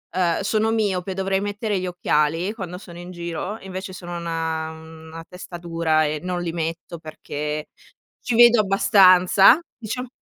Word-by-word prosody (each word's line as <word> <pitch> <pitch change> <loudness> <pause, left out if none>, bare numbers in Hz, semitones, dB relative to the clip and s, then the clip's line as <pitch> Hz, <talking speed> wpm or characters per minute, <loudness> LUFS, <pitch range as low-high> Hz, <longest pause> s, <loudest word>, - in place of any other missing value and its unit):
ehm, 175 -2 +1
sono 215 +2 +1
miope, 195 -4 -1
dovrei 190 0 -1
mettere 205 0 -2
gli 185 - -3
occhiali 170 +1 0
quando 180 -5 -7
sono 175 -3 -12
in 175 +1 -9
giro, 175 +3 -5
invece 190 0 -7
sono 175 -2 -7
una 165 -1 -3
una 160 0 -11
testa 180 -1 -9
dura 165 -2 0
e 150 0 -2
non 180 0 -3
li 170 - -3
metto 165 0 -5
perché 150 -1 -6 0.5
ci 245 - -1
vedo 240 0 +7
abbastanza; 195 - +5 0.2
diciam 250 +3 -5
180 Hz, 155 wpm, -22 LUFS, 165-195 Hz, 0.5 s, vedo